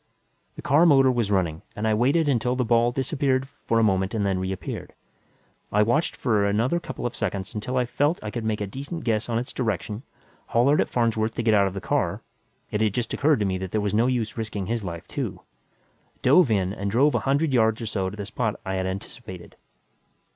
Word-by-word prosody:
The - - -9
car 155 +6 +5
motor 135 -4 +6
was 120 -5 0
running 90 -5 0
and 110 +1 -1
I 110 - +3
waited 140 +8 +2
until 125 -2 +1
the 125 -1 0
ball 120 +1 +3
disappeared 135 0 0 0.2
for 115 - +2
a 115 - +4
moment 95 0 +1
and 105 -2 0
then 95 -2 0
reappeared. 95 0 -5 0.8
I 105 +1 +4
watched 135 +10 +1
for 110 -5 +1
another 110 +11 +1
couple 170 - -6
of 120 - -2
seconds 100 -3 -3
until 120 +5 -3
I 125 - +2
felt 145 +7 +1
I 105 - -4
could 120 0 -4
make 110 -1 -1
a - - 0
decent 140 - -6
guess 110 -1 0
on 115 - 0
its 125 +4 -4
direction, 105 -2 -2 0.5
hollered 135 +6 +3
at - - -1
Farnsworth 115 -2 0
to 120 - -2
get 110 -1 +3
out 100 -2 +4
of 95 - -5
the 95 - -4
car - - -1 0.5
it 105 - -1
had 105 -2 +1
just 120 -2 -2
occurred 150 +1 +3
to - - +2
me 95 -1 -1
that 95 0 -4
there 110 - 0
was 105 -1 -1
no 115 +3 +3
use 120 -3 -1
risking 105 -3 -3
his 115 +2 -2
life, 85 -3 -6
too - - -4 0.8
dove 145 +3 +6
in 95 -3 +1
and 100 -1 -3
drove 135 +8 +3
a - - +2
hundred 140 +2 +1
yards 110 -2 +3
or 115 - -4
so 95 -4 -2
to 105 - -10
the 100 - -4
spot 110 +1 -2
I 95 0 -2
had 95 0 -1
anticipated. 95 -1 -7
110 Hz, 225 wpm, -25 LUFS, 100-125 Hz, 0.8 s, motor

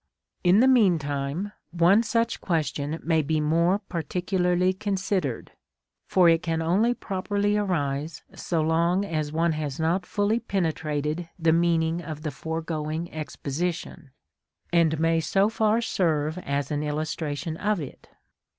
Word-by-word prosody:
In 185 +4 +5
the 260 - +5
meantime 170 - +2 0.2
one 175 +5 +4
such 230 0 0
question 155 -2 -1
may 160 -1 +2
be 155 +1 0
more 165 +5 +2
particularly 180 0 0
considered, 190 - -2 0.6
for 180 -2 +4
it 165 0 +4
can 165 -2 -1
only 200 +9 +2
properly 205 +1 -1
arise 155 -6 -1
so 165 -3 -1
long 170 +4 +2
as 155 -5 -2
one 165 +2 +1
has 150 -3 -4
not 175 +3 0
fully 210 +3 +1
penetrated 160 -5 -2
the 165 -2 +3
meaning 165 0 +2
of 155 -2 -7
the 155 - -2
foregoing 160 +1 -4
exposition, 160 +1 -4 0.6
and 160 -2 +3
may 165 0 +2
so 195 +5 +2
far 220 +1 +2
serve 160 -6 0
as 140 -2 -2
an 145 0 -1
illustration 155 +1 -3
of 210 0 0
it. 145 -5 -9
165 Hz, 130 wpm, -26 LUFS, 155-190 Hz, 0.6 s, In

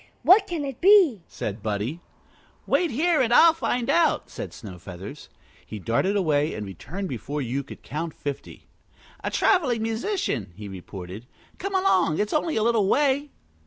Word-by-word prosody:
"What 395 +3 +6
can 325 -5 -3
it 270 -3 -7
be?" 360 - +6
said 105 +1 -5
Buddie. 110 +9 -2 0.7
"Wait 350 - +2
here 310 +5 +2
and 235 -2 +1
I'll 325 +7 +7
find 250 -7 -1
out," 325 +4 +2
said - - -6
Snowfeathers. 95 - -10 0.3
He 110 - -8
darted 115 - 0
away 155 -5 +1
and 105 - -5
returned 170 - -6
before 145 +2 -4
you 135 +1 -2
could 140 - -12
count 160 +2 -5
fifty. 145 -2 -7 0.6
"A - - -1
traveling 260 - +2
musician," 225 - -2
he 105 0 -8
reported. 95 +3 -9 0.3
"Come 390 +1 -3
along. 185 - +2
It's 210 0 -1
only 310 +1 0
a 220 - +1
little 225 -4 +2
way." 285 +4 +2
195 Hz, 160 wpm, -25 LUFS, -, 0.7 s, I'll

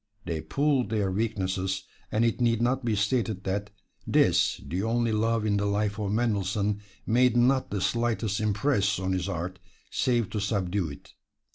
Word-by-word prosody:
They 80 -3 -2
pooled 135 - +1
their 105 -4 0
weaknesses, 95 -2 -1 0.3
and 110 +2 +2
it 115 +1 0
need 115 -2 +3
not 125 +3 +1
be 115 -2 +1
stated 105 -1 0
that 100 +1 -2 0.4
this, - - +3
the 90 +3 -2
only 115 +1 +1
love 110 0 +1
in 100 -1 +2
the 100 0 0
life 100 +1 0
of 100 -2 -1
Mendelssohn, 105 -2 0 0.2
made 120 +1 +3
not 130 +2 +3
the 100 -2 -2
slightest 115 -3 0
impress 105 -1 +1
on 95 0 -2
his 95 +1 -1
art, 90 +1 -4 0.3
save 120 -5 +1
to 105 - -2
subdue 100 -4 -1
it. 70 -1 -12
105 Hz, 165 wpm, -27 LUFS, 95-115 Hz, 0.4 s, need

